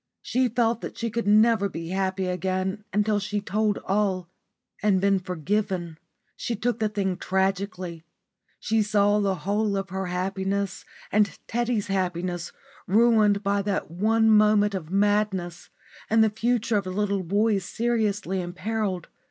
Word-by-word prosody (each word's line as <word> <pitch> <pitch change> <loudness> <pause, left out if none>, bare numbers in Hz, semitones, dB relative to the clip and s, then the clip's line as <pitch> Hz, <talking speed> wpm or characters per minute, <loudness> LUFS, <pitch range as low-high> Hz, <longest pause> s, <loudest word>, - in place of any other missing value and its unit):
She 255 +1 +1
felt 230 0 +1
that - - -7
she 230 -1 -2
could 235 -2 -2
never 215 0 +4
be 165 -2 -6
happy 190 0 -1
again 185 +3 -2
until 210 +1 +1
she 210 +1 -3
had 205 - -4
told 210 0 +1
all 190 -3 0 0.5
and 205 -3 +3
been 195 0 +3
forgiven. 180 -1 -2 0.4
She 235 - -3
took 230 +2 -1
the 215 -1 +1
thing 195 -3 -1
tragically. 190 -3 -2 0.6
She 220 0 +1
saw 205 0 +3
the 200 -2 +1
whole 205 0 +1
of 195 -1 -4
her 190 0 -3
own - - -5
happiness 190 +1 -2 0.3
and 210 0 +2
Teddy's 240 -2 0
happiness 180 -2 -2 0.4
ruined 215 -1 +4
by 200 0 +1
that 200 -5 -2
one 220 +5 +2
moment 210 -1 +4
of 175 -5 -5
madness 195 -3 0 0.4
and 220 0 +5
the 220 - +2
future 230 0 0
of 200 - -2
the - - -4
little 200 0 0
boys 200 +2 +1
seriously 210 -4 -1
imperilled. 185 +1 -3
200 Hz, 150 wpm, -25 LUFS, 185-215 Hz, 0.6 s, and